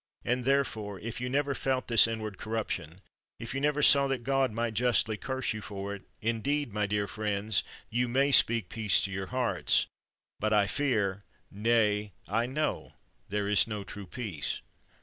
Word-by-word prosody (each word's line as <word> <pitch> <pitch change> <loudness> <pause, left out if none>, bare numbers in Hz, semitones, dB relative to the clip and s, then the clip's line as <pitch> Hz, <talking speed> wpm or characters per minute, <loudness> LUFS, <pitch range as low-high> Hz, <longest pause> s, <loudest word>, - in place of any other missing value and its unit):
And, 125 0 0
therefore, 110 -8 0
if 115 +2 -6
you 125 - -2
never 140 +1 +1
felt 130 -1 -1
this 115 -1 +6
in 115 -1 -3
ward 105 -3 -6
corruption, 95 -6 -4 0.4
if 115 +1 -6
you 135 - -2
never 150 0 +1
saw 140 0 +7
that 135 -3 -2
God 135 0 +2
might 115 +1 -2
justly 115 -1 +2
curse 130 +2 -2
you 110 - -6
for 100 -1 -5
it, 100 - -8 0.2
indeed, 115 +3 -1
my 105 -1 0
dear 105 0 0
friends, 105 -1 0 0.3
you 120 +2 +1
may 135 +4 +2
speak 115 -6 +4
peace 105 0 +3
to 95 - -2
your 95 0 -4
hearts, 130 -1 +1 0.5
but 110 +1 +1
I 105 -1 +5
fear, 100 -5 0 0.3
nay, 105 -1 +1
I 115 +4 0
know, 150 +4 -2 0.4
there 105 +1 -1
is 105 +2 +4
no 105 -2 -4
true 100 0 -9
peace. 100 -8 -4
110 Hz, 175 wpm, -30 LUFS, 105-130 Hz, 0.5 s, saw